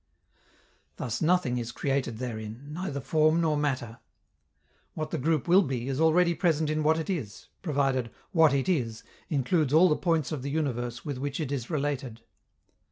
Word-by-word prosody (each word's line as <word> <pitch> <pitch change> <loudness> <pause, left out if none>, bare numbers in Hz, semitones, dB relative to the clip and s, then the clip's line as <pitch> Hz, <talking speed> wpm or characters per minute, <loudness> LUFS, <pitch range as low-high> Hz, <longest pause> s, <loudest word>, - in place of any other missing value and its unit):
Thus 125 -1 -4
nothing 160 -7 +2
is 120 0 -4
created 135 -3 -1
therein, 115 +2 -6
neither 155 -3 -4
form 155 +3 +2
nor 160 -2 +2
matter. 130 -6 -2 1.0
What 155 -1 -4
the - - -2
group 155 +1 0
will 180 +3 +6
be 130 -7 -3
is 135 +2 -1
already 170 +2 +4
present 160 -3 +1
in 155 0 0
what 155 +1 +3
it 160 - -3
is, 140 - -4
provided 135 -6 0 0.2
"what 160 -5 +5
it 135 -1 0
is" 120 -11 -1 0.3
includes 150 0 +1
all 180 +3 +7
the 150 - +3
points 165 -4 0
of 150 -4 -3
the 140 - -4
universe 125 -5 -2
with 140 -4 -4
which 140 +2 -3
it 150 -4 -3
is 125 -4 -3
related. 140 -6 -2
145 Hz, 170 wpm, -28 LUFS, 125-160 Hz, 1.0 s, all